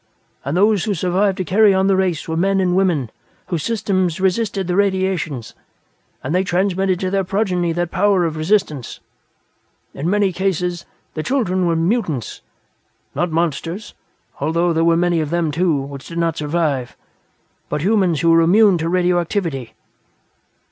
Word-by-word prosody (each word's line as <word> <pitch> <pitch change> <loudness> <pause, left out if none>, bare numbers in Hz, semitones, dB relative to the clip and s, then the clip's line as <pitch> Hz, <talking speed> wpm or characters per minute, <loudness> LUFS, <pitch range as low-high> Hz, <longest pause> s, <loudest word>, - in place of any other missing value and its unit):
And 140 +5 -2
those 205 -1 +3
who 205 - -1
survived 185 +3 0
to 185 - -1
carry 200 +3 +4
on 190 0 +2
the 195 0 +3
race 185 -4 -1
were 160 - -2
men 195 +3 +1
and 180 -1 +1
women 170 - +1 0.4
whose 170 -4 -1
systems 185 -3 -1
resisted 195 +1 0
the 180 0 -1
radiations, 190 - -1 0.7
and 130 - -3
they 185 +1 +2
transmitted 190 0 0
to 185 -1 -1
their 195 0 +1
progeny 180 -3 0
that 175 0 -2
power 190 -1 +2
of 160 -1 -2
resistance. 155 - -1 0.9
In 150 +5 -3
many 200 -1 +1
cases, 180 -2 -2 0.3
their 155 - -3
children 185 - 0
were 165 - +1
mutants 165 - -1 0.7
not 175 - -1
monsters, 170 +4 -2 0.5
although 170 +4 +1
there 165 0 +1
were 165 0 +3
many 175 -1 +1
of 155 -2 -2
them, 170 -1 0
too, 165 -1 +1
which 140 0 -7
did 170 - -8
not 165 -1 0
survive 145 -6 -2 0.7
but 150 - -2
humans 185 -5 +2
who 165 - +4
were 165 0 +5
immune 190 +2 +4
to 165 +1 -1
radioactivity." 175 - -1
175 Hz, 160 wpm, -19 LUFS, 165-195 Hz, 0.9 s, were